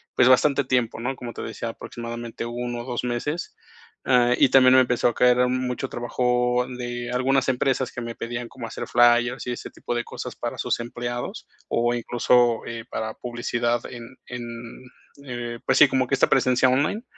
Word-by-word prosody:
pues, 120 - +5
bastante 140 +2 +4
tiempo, 125 -3 0
¿no? 130 +3 -2
Como 120 -2 -7
te - - -7
decía, 115 - -5
aproximadamente 115 0 -7
1 120 0 -4
o - - -9
2 125 -1 -3
meses, 145 +8 -3 0.5
ah, 125 -1 +4
y - - +5
también 130 -1 +6
me 130 - +7
empezó 125 -1 +1
a - - -4
caer 125 0 +4
mucho 130 +1 -2
trabajo 125 0 0
de 120 -1 -5
algunas 130 +1 +1
empresas 130 0 0
que 120 - -6
me 115 0 -6
pedían 120 +1 -5
como 120 -3 -8
hacer - - -6
flyers 120 0 +3
y 125 - -1
ese - - -6
tipo - - -5
de 120 - -1
cosas - - -7
para - - -5
sus - - -1
empleados, 120 +1 -5 0.2
o 120 +1 +1
incluso, 120 0 +2
eh, 115 -1 -6
para 110 0 -4
publicidad 120 -1 -2
en 120 +1 -10
en, 125 -1 -6 0.8
eh, 120 -2 -5
pues - - +2
sí, - - +8
como 130 -1 0
que 135 - +2
esta - - +3
presencia 130 -1 +3
online. 145 - +1
120 Hz, 185 wpm, -24 LUFS, 120-125 Hz, 0.8 s, sí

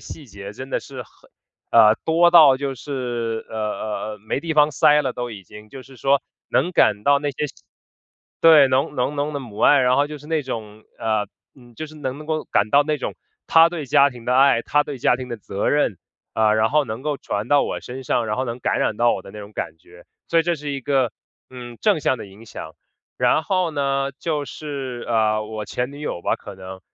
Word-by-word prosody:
细 150 - -10
节 100 -3 -9
真 130 +5 -9
的 - - -1
是 130 -2 -8
很 105 - -25 0.4
呃， 110 -2 +7
多 170 +2 +4
到 150 -6 +8
就 135 0 -3
是， 120 -4 -4
呃， 110 - -8
呃， 110 0 -3
呃， - - -15
没 110 +6 -3
地 165 0 -3
方 150 0 +4
塞 150 +2 +5
了 130 -4 -2
都 120 -1 -5
已 100 -4 -10
经。 105 +4 -13
就 135 +4 -10
是 135 0 -16
说 140 +2 +2 0.3
能 180 - +1
感 105 -9 +3
到 140 0 +4
那 145 - -1
些 150 +2 -3
细 - - -11 0.9
对， 160 -4 +8
浓 135 +3 0
浓 125 +4 0
浓 145 +1 -1
的 - - -1
母 110 -5 -10
爱， 145 - +5
然 125 0 +3
后 145 +1 +3
就 150 - -7
是 145 - -15
那 160 -1 0
种， 110 -4 -7 0.2
呃， 110 -2 0 0.3
嗯， 120 -3 -18
就 155 - -5
是 155 - -14
能 145 +1 -5
够 155 -1 -1
感 105 +1 +2
到 145 +1 +5
那 150 -1 -1
种 - - -4 0.3
她 165 0 +6
对 165 -5 -6
家 140 +2 +5
庭 120 -2 -12
的 125 +1 +1
爱、 135 -4 +5
她 145 0 +2
对 140 -3 -6
家 - - +3
庭 125 0 -7
的 120 - -4
责 100 -1 -3
任， 145 - +1 0.4
呃， 110 -1 +3
然 110 +1 +2
后 150 -1 +3
能 110 +3 -6
够 150 0 -1
传 105 +3 -4
到 145 -1 +4
我 - - -3
身 130 +2 -8
上， 120 -1 0
然 105 0 -2
后 130 - -1
能 120 +1 -4
感 - - 0
染 105 - 0
到 120 0 +3
我 - - -3
的 - - -12
那 105 - -9
种 105 +1 -11
感 80 - -5
觉。 85 +2 -18 0.2
所 165 - +3
以 - - 0
这 175 +1 0
是 150 -2 -6
一 140 - -4
个， 130 -4 +1 0.4
嗯， 120 -2 -9
正 205 -7 +3
向 130 - +1
的 110 - -8
影 100 +4 -15
响， - - -9 0.4
然 155 - +3
后 185 -1 0
呢， 140 -1 0
就 150 -3 -2
是， 135 -5 -6
呃， 110 -2 +1
我 110 0 -6
前 125 +2 -3
女 145 - -10
友 115 -12 -4
吧， - - 0
可 105 - -10
能， 95 0 -10
130 Hz, 255 characters per minute, -22 LUFS, 110-145 Hz, 0.9 s, 到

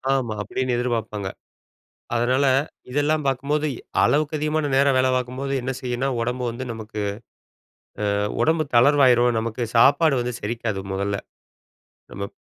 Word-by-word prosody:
ஆமா. 120 -5 -1
அப்டின்னு 125 +5 -2
எதிர்பார்ப்பாங்க. 115 -5 -2 0.9
அதுனால 125 +4 +2 0.5
இதெல்லாம் 145 +2 +1
பார்க்கும்போது 145 +3 0
எ - - -11 0.2
அளவுக்கு 150 +1 +2
அதிகமான 150 0 0
நேரம் 140 0 +4
வேல 130 0 +3
பார்க்கும்போது, 130 +2 -3
என்ன 130 +2 -2
செய்யுன்னா, 125 +1 -2
உடம்பு 125 +2 -2
வந்து 120 +3 -6
நமக்கு 110 -1 -6 1.1
ஆ - - 0 0.2
உடம்பு 160 0 +2
தளர்வு 140 +4 +5
ஆயிரும். 120 -1 +4
நமக்கு 115 +1 -3
சாப்பாடு 140 +3 +5
வந்து 125 0 -3
செரிக்காது 110 -2 -3
முதல. 100 +1 -1 1.0
நம்ம 100 - -5
ப் - - -47
125 Hz, 135 wpm, -23 LUFS, 115-140 Hz, 1.1 s, தளர்வு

